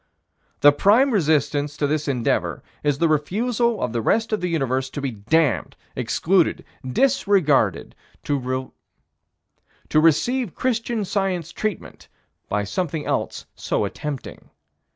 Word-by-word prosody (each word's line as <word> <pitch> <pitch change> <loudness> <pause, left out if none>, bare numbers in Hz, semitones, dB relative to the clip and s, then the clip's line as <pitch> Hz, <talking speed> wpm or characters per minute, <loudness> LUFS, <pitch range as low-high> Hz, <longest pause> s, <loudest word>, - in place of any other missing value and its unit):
The 145 - +8
prime 220 - +4
resistance 150 - +1
to 145 - 0
this 150 +1 -1
endeavor 125 -4 -1 0.2
is 145 -2 +1
the 165 - +2
refusal 220 - 0
of 125 - -2
the 120 - -1
rest 220 - +1
of 215 - 0
the 180 - 0
universe 135 -5 -1
to 145 - -6
be 135 -2 -2
damned, 115 - 0 0.2
excluded, 160 +9 +1 0.2
disregarded, 150 - +2 0.3
to 130 -3 -1 1.3
receive 165 - +2
Christian 235 -3 -1
Science 190 -4 -2
treatment, 210 +2 -5 0.4
by 105 0 0
something 155 - -3
else - - -2
so - - -1
attempting. 150 -3 -6
155 Hz, 120 wpm, -22 LUFS, 135-200 Hz, 1.3 s, The